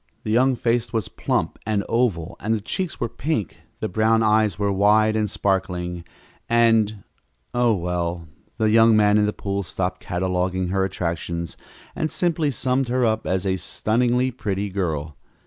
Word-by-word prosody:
The 110 - -3
young 130 +3 +3
face 120 -1 0
was 110 -4 -2
plump - - -2
and 105 -2 0
oval, 105 -7 0
and 110 +2 0
the 110 - -3
cheeks 180 - -3
were 120 - 0
pink, 115 - -3 0.2
the - - 0
brown 110 +3 +2
eyes 110 -4 +3
were 100 0 0
wide 105 +2 +4
and 105 -1 0
sparkling 90 -3 -1 0.5
and 115 -3 +3 0.5
Oh, 120 -2 +3
well, 85 -2 -3 0.3
the 110 -2 +2
young 115 0 +6
man 105 0 +4
in 105 - +3
the - - +1
pool 100 -1 -3
stopped 90 0 -3
cataloguing 90 0 -1
her 95 +1 +1
attractions 85 -2 -3 0.4
and 155 - -1
simply 165 -4 0
summed 130 0 0
her 125 0 +1
up 110 -1 0
as 95 +1 0
a 95 -1 +1
stunningly 125 +6 0
pretty 100 -4 -3
girl. 80 -6 -3
105 Hz, 165 wpm, -23 LUFS, 95-115 Hz, 0.5 s, young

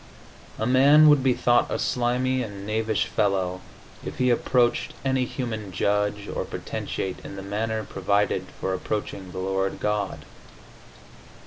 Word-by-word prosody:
A 110 - -1
man 140 +5 +7
would 145 -2 +6
be 130 -2 +2
thought 120 0 +3
a - - -1
slimy 125 +1 0
and 100 -4 -6
knavish 110 0 0
fellow 95 -4 0 0.4
if - - -6
he 125 -1 +3
approached 120 0 +1
any 130 -1 +2
human 110 -6 -4
judge 105 +2 0
or - - -3
potentate 95 -1 -4
in - - -8
the 95 - -7
manner 110 +2 -2
provided 100 +1 0
for 95 - -1
approaching 95 -1 -4
the 90 - -9
Lord 95 +1 -1
God. 105 -2 -2
105 Hz, 140 wpm, -25 LUFS, 100-125 Hz, 0.4 s, man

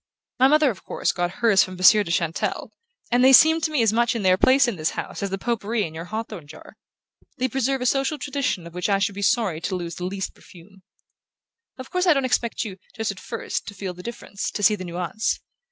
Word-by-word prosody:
My 260 - +6
mother, 300 -1 +4
of 190 - -12
course, - - -1
got 175 -1 -1
hers 215 0 +3
from 185 - -7
Monsieur 195 +3 +6
de 175 - -8
Chantelle, 170 -1 -2 0.4
and 245 +1 +3
they 260 - +7
seem 320 +4 +7
to 315 - 0
me 295 -6 +1
as 220 -1 +2
much 235 +1 +2
in 225 - -2
their 185 -1 +5
place 260 +7 +4
in 235 - -2
this 155 -2 -2
house - - -5
as 200 - -2
the 195 - -3
pot 235 +2 -2
pourri 220 +1 -1
in 160 - -5
your 165 +1 -7
hawthorn 215 -5 -6
jar. 155 - -13 0.6
They 255 - 0
preserve 270 +1 -1
a - - -2
social 275 +4 +1
tradition 255 -10 -2
of 170 - -11
which 180 +3 -2
I 200 - +3
should 195 0 0
be 200 - -6
sorry 200 -6 +1
to 185 - -2
lose 175 -2 -5
the 180 - -4
least 190 +1 -4
perfume. 190 +2 -17 1.0
Of 260 0 -10
course 365 0 0
I 345 - +7
don't 275 -1 +1
expect 235 -2 -1
you, 195 -3 -7 0.2
just 225 -3 -2
at 195 - -10
first, 230 - -5
to 205 - -8
feel 185 -1 -5
the 180 - -11
difference, 220 -2 -6
to 205 - -5
see 215 - +6
the 185 -3 -5
nuance. 180 +5 -2
210 Hz, 245 wpm, -23 LUFS, 185-250 Hz, 1.0 s, they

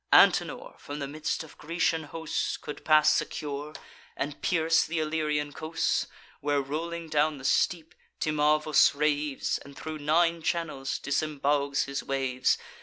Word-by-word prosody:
Antenor, - - +4
from 145 - -7
the 140 -2 -4
midst 155 +3 -3
of 160 - -15
Grecian 165 0 0
hosts, 160 +1 -3
Could 150 - -8
pass 155 -1 +5
secure, 145 +1 -3 0.4
and 145 +1 -4
pierce 165 -1 +2
th' 160 - -8
Illyrian 155 -2 -1
coasts, 160 +2 -1 0.3
Where, 145 0 +1
rolling 165 +4 -4
down 155 0 +1
the 135 - -10
steep, 165 +2 +1 0.3
Timavus 155 0 +3
raves 150 -1 0
And 140 0 -13
thro' 155 0 -5
nine 165 +3 +2
channels 155 -5 -2
disembogues 145 -1 0
his 140 0 -3
waves. 130 -2 0
150 Hz, 135 wpm, -28 LUFS, 145-160 Hz, 0.4 s, pass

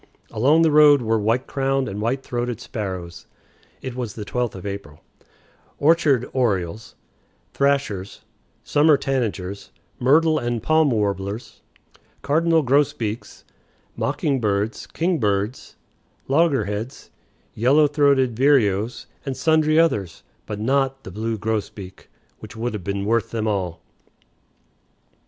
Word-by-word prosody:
Along 145 +9 +3
the 160 - +3
road 145 -3 +6
were 110 0 +1
white 115 +5 0
crowned 135 -1 -1
and 100 0 -5
white 130 +5 -1
throated 120 -1 -3
sparrows 95 -8 -6 0.6
(it 130 -2 -5
was 120 -5 -5
the 105 - -6
12th 120 -1 -2
of 95 - -9
April), 100 -7 -7 0.8
orchard 145 -5 +3
orioles, 105 -5 -1 0.6
thrashers, 140 -9 -1 0.4
summer 150 0 +4
tanagers, 105 -9 -3 0.3
myrtle 155 +5 +4
and 120 -2 -3
paim 155 -1 +3
warblers, 100 -1 -3 0.6
cardinal 160 +2 +2
grosbeaks, 120 -5 -1 0.5
mocking 140 -3 -1
birds, 105 0 -1
kingbirds, 115 - -1 0.5
logger 145 0 +2
heads, 105 +6 -6 0.4
yellow 135 +7 +4
throated 140 -4 +2
vireos, 120 -5 +2 0.2
and 135 -2 -4
sundry 155 -1 +3
others, 105 - +1 0.2
but 105 -1 -5
not 135 +3 0
the 95 - -9
blue 110 +3 -3
grosbeak, 105 -3 -5 0.3
which - - -11
would 115 +1 -3
have 105 -4 -5
been 100 +1 -3
worth 115 +1 +1
them 110 -1 -2
all. 95 -5 -2
120 Hz, 120 wpm, -22 LUFS, 105-140 Hz, 0.8 s, road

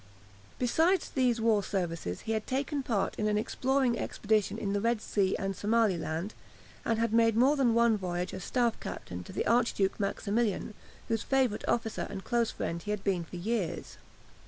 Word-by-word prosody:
Besides 325 +10 +2
these 250 -3 +2
war 220 -2 +3
services 170 - -3
he 225 - -4
had 220 -1 -1
taken 280 +2 -1
part 220 -7 0
in 215 - +1
an 210 0 +2
exploring 255 +2 +1
expedition 215 0 0
in 200 -3 -2
the 205 - 0
Red 230 0 +1
Sea 195 -3 +1
and 195 0 -2
Somaliland, 200 -4 0 0.5
and 225 - +1
he - - 0
had 230 -1 0
made 230 -1 +4
more 265 +5 +5
than 250 -5 +3
one 235 -2 +4
voyage 180 -1 -3
as 185 - -6
staff 240 -1 +1
captain 90 0 -6
to - - -10
the - - -2
Archduke 230 -5 +2
Maximilian, 205 +1 -1 0.3
whose 225 -2 0
favourite 260 -5 +1
officer 225 -2 -1
and 195 -1 -6
close 235 -2 +1
friend 170 0 -3
he 210 - -8
had 210 -2 -2
been 185 -4 0
for 170 - -10
years. 195 0 -3
220 Hz, 180 wpm, -30 LUFS, 195-235 Hz, 0.5 s, more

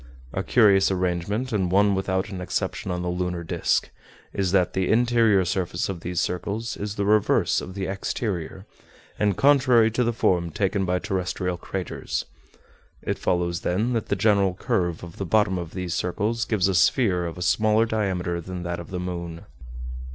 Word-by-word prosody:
A - - -1
curious 100 -5 +4
arrangement, 95 +6 -1
and 95 -4 0
one 100 +1 +4
without 95 +1 -1
an 95 -3 -6
exception 90 - -3
on 90 0 -2
the - - -3
lunar 90 -1 -2
disc, 80 - 0 0.4
is 95 -3 0
that 95 -2 +2
the 95 -1 0
interior 115 -4 +4
surface 90 0 -1
of 95 -3 -4
these 90 0 -3
circles 105 +5 -2
is 105 0 -5
the 100 - -1
reverse 105 0 +3
of 95 - -8
the 95 -1 -3
exterior, 95 -2 -3 0.5
and 105 -3 +1
contrary 125 -5 +5
to 125 +3 +1
the 120 - +1
form 90 -6 +1
taken 95 +3 0
by 90 0 +1
terrestrial 90 0 -2
craters. 90 +1 -4 0.8
It - - -2
follows, 85 -1 0
then, 110 +8 0
that 115 -3 -1
the - - 0
general 100 -2 +2
curve 85 -2 -1
of 85 -1 -10
the - - -3
bottom 100 -2 +2
of 85 -1 -7
these 90 -2 -3
circles 105 +7 -1
gives 105 -6 +1
a 95 - +1
sphere 90 -2 +3
of 85 - -7
a 90 - -3
smaller 110 +4 +3
diameter 95 -6 -1
than 90 +1 -6
that 85 0 -3
of 85 - -9
the 90 - -4
moon." 85 -2 -5
95 Hz, 180 wpm, -24 LUFS, 90-105 Hz, 0.8 s, contrary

